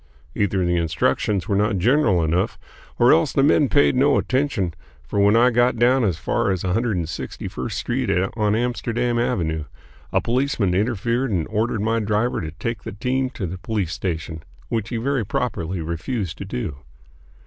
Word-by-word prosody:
Either 95 -2 0
the 85 0 +1
instructions 85 +4 0
were 100 - +1
not 105 0 +1
general 105 - +3
enough, 90 +6 0 0.4
or 120 - +6
else 160 -2 +3
the 135 - +3
men 145 -1 +4
paid 145 -2 +4
no 140 +2 +4
attention; 130 - 0 0.3
for 60 +11 -3
when 100 +2 +5
I 120 +2 +5
got 120 +1 +2
down 125 +2 +4
as 95 -7 +1
far 115 +5 0
as 95 -2 -1
161st 90 -4 -2
Street - - -2 0.3
on 105 -2 +1
Amsterdam 120 0 -1
Avenue, 80 -11 -1 0.5
a - - +3
policeman 120 -6 0
interfered 115 +5 0
and 90 -7 -1
ordered 110 0 0
my 115 +1 +1
driver 110 +3 0
to 80 - -4
take 115 +9 -4
the - - -7
team 130 +5 -1
to 120 -6 -5
the 90 +1 -5
police 100 -5 -2
station, 80 -3 -4 0.3
which 115 -2 -2
he 120 - -2
very 130 +1 0
properly 95 -5 -2
refused 85 +3 -3
to - - -5
do. 70 -5 -4
110 Hz, 170 wpm, -22 LUFS, 90-120 Hz, 0.5 s, or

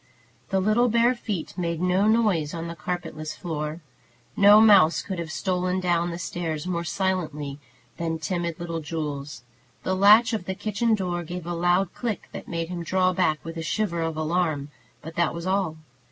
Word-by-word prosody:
The 190 - +1
little 215 +5 +3
bare 235 +2 +4
feet 210 -10 -5
made 170 -2 -1
no 180 +3 +2
noise 205 -9 +2
on 165 0 -4
the 170 - -6
carpetless 155 -2 -5
floor. 155 -1 -4 0.5
No 205 +1 +8
mouse 200 -7 +6
could 190 -3 -5
have 165 -1 -5
stolen 185 +1 -1
down 175 -1 +1
the 170 - -4
stairs 165 -3 -4
more 170 -2 -2
silently 160 -6 -2 0.4
than 165 -1 -2
timid 170 +1 -3
little 170 -1 -3
Jules. 150 -5 -5 0.4
The 185 - 0
latch 215 +4 +6
of 215 -5 -2
the 190 - -3
kitchen 220 +3 +1
door 180 -3 -2
gave 175 +1 -6
a 175 - -3
loud 175 +2 +1
click 230 -6 -4
that - - -8
made 165 -1 -3
him 180 -1 -4
draw 185 +2 +2
back 170 -4 0
with 165 0 -6
a - - -3
shiver 170 0 -1
of 165 -1 -2
alarm; 155 -3 -1 0.3
but 160 - -8
that 170 -2 +1
was 170 0 -6
all. 185 -4 0
175 Hz, 180 wpm, -25 LUFS, 165-190 Hz, 0.5 s, No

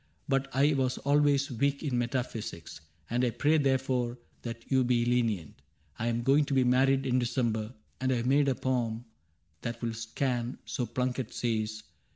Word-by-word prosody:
But 135 -1 +1
I 140 +4 +3
was 130 -2 0
always 145 0 +2
weak 140 +5 0
in 140 -5 -1
metaphysics. 120 -9 -3 0.3
And 120 +2 0
I 125 - +3
pray 150 +6 +2
therefore 130 -3 +1 0.2
that 115 +1 -8
you 130 -1 +4
be 120 -1 +2
lenient. 115 -9 0 0.4
I 115 - -1
*m 120 0 0
going 140 +4 +4
to 140 - -1
be 130 - +5
married 135 +2 +3
in 130 -1 +2
December, 120 -2 -1 0.2
And 130 0 0
I - - +3
have 120 0 -1
made 140 +2 +4
a 130 - +1
poem 120 -3 -1 0.6
that 115 0 -4
will 115 -1 -2
scan 120 +2 -2
— - - -39
So 125 -4 -1
Plunket 125 -1 -2
says. 110 -2 -1
125 Hz, 180 wpm, -30 LUFS, 115-135 Hz, 0.6 s, be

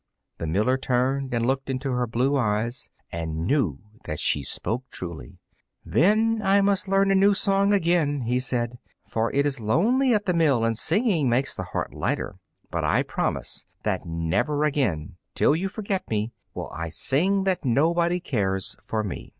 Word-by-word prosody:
The 80 - -3
miller 110 +11 +1
turned 130 +1 0
and 115 -1 0
looked 135 +2 -1
into 135 +1 -2
her 125 -1 0
blue 125 +5 +1
eyes, 115 -1 -1 0.2
and 80 -1 -3
knew 100 - +1 0.2
that 75 - -4
she 75 - +1
spoke 125 - -3
truly. 85 - -7 0.5
"Then 220 +6 +3
I 195 0 +4
must 200 -1 +1
learn 195 0 +3
a - - +5
new 200 +1 +5
song 195 0 +2
again," 165 -7 +2
he 125 +1 0
said, 120 -1 -2 0.3
"for 115 +1 -1
it 140 +1 +2
is 140 -3 -1
lonely 225 - +2
at 210 -1 -1
the 180 - +1
mill, 145 -9 +3
and 115 0 +1
singing 165 - +2
makes 125 +3 +1
the - - -5
heart - - -4
lighter. - - -2 0.3
But - - -2
I - - +3
will - - -9
promise - - -2 0.2
that - - -2
never 85 - 0
again, 105 - -1 0.2
till 150 - +3
you 190 +4 -1
forget 200 -2 -3
me, 110 +1 -1 0.2
will - - -5
I 85 +1 -4
sing 185 - +2
that 190 -2 0
nobody 170 +7 +2
cares 95 - -1
for 110 -1 -2
me." 100 - -6
135 Hz, 175 wpm, -25 LUFS, 110-180 Hz, 0.5 s, a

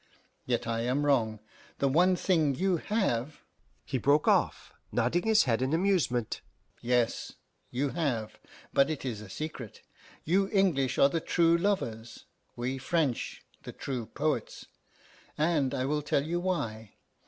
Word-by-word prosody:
Yet 120 -1 0
I 115 0 -1
am 130 +5 0
wrong. 110 -7 +1 0.4
The 140 - +1
one 180 +7 +4
thing 160 -6 +2
you 185 +3 +1
have 155 - -1 0.2
" - - -40
He 130 - -2
broke 145 +5 +3
off, - - +1 0.2
nodding 145 - +1
his 220 -1 +5
head 115 -2 +1
in 130 +3 0
amusement. 165 - 0 0.4
"Yes, 120 -1 0 0.4
you 135 +3 -1
have, 130 -10 -2 0.3
but 140 +2 +4
it 155 -4 -4
is 115 -5 -3
a 105 - -10
secret. 135 -3 -7 0.4
You 195 +4 +2
English 175 - +2
are 140 - +6
the 165 +2 -1
true 170 0 +3
lovers, 145 - -2 0.3
we 130 +2 -3
French 145 -4 -1 0.2
the - - -9
true 125 -5 -4
poets; 145 -5 -2 0.7
and 150 -4 +2
I 130 - -1
will 150 +2 0
tell 140 -1 0
you 170 +2 -1
why. 115 - -3
140 Hz, 150 wpm, -29 LUFS, 120-170 Hz, 0.7 s, are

